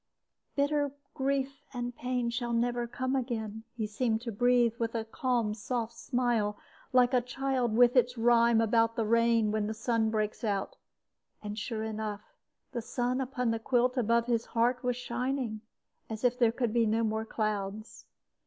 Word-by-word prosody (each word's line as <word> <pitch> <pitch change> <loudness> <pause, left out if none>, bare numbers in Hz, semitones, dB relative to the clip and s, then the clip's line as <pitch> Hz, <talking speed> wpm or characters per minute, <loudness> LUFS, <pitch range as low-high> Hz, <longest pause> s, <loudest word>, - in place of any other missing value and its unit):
"'Bitter 285 0 +1 0.2
grief 275 0 -1
and 245 0 -3
pain 250 -1 -1
shall 240 0 -2
never 240 0 0
come 260 +2 -2
again,' 220 -4 -3
he 225 -2 -2
seemed 220 +1 0
to 235 -1 -4
breathe, 240 +1 +3
with 230 0 -2
a 225 -1 -1
calm, 235 -2 0
soft 230 +1 -3
smile, 235 -4 0 0.3
like 250 0 +4
a 250 - +4
child 250 -2 -1
with 245 +1 +6
its 250 0 +3
rhyme 235 0 +4
about 225 0 +2
the 225 - 0
rain 230 -1 +3
when 215 -1 0
the 220 - -3
sun 225 0 +1
breaks 215 0 -2
out; 200 -3 -1 0.7
and 210 +1 -4
sure 220 0 -3
enough, 215 -1 -5 0.4
the 240 -3 -3
sun 250 +3 -1
upon 250 -2 -1
the 225 - -1
quilt 250 +2 +2
above 235 -1 +2
his 235 -1 0
heart 240 +2 +1
was 250 -1 +1
shining, 250 -2 -2 0.5
as 220 +1 -6
if 245 0 +2
there 235 -2 +5
could 235 -2 -1
be 235 -2 +3
no 225 +2 +1
more 220 0 0
clouds. 215 -1 -3
235 Hz, 170 wpm, -30 LUFS, 220-250 Hz, 0.7 s, with